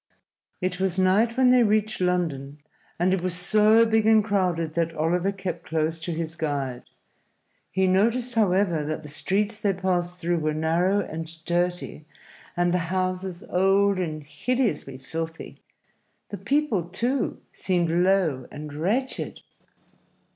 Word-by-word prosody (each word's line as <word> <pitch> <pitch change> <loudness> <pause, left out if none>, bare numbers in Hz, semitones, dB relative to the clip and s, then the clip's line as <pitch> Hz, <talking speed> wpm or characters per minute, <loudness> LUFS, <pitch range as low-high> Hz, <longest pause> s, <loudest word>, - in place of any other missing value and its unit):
It 180 0 -2
was 190 -1 0
night 205 +6 +3
when 255 -1 +5
they 250 -1 +6
reached 215 -2 +1
London, 160 -6 -1 0.4
and 180 +2 +2
it 190 - 0
was 180 -1 -1
so 215 +5 +4
big 220 -1 +2
and 220 -1 +6
crowded 180 -6 0
that 165 0 -1
Oliver 175 +5 +1
kept 190 -2 -5
close 160 0 -1
to 165 +2 -4
his 165 0 -4
guide. 140 -6 -3 0.9
He 190 0 +1
noticed, 230 +7 +2
however, 190 -7 +2
that 155 +1 -4
the 150 - -9
streets 205 +8 -1
they 200 -2 +2
passed 180 -1 -1
through 175 -1 0
were 155 -1 -1
narrow 170 +6 +1
and 160 -2 -6 0.2
dirty 175 -2 -2 0.5
and 175 0 +2
the 180 - +2
houses 185 -1 -2
old 195 +1 +3
and 155 -4 -3
hideously 150 - -2
filthy. 160 +5 -6 0.7
The 205 - -5
people, 235 - 0
too, 240 +8 -1
seemed 175 -3 0
low 175 -7 +2
and 150 0 -8
wretched. 210 - -1
180 Hz, 140 wpm, -25 LUFS, 165-200 Hz, 0.9 s, they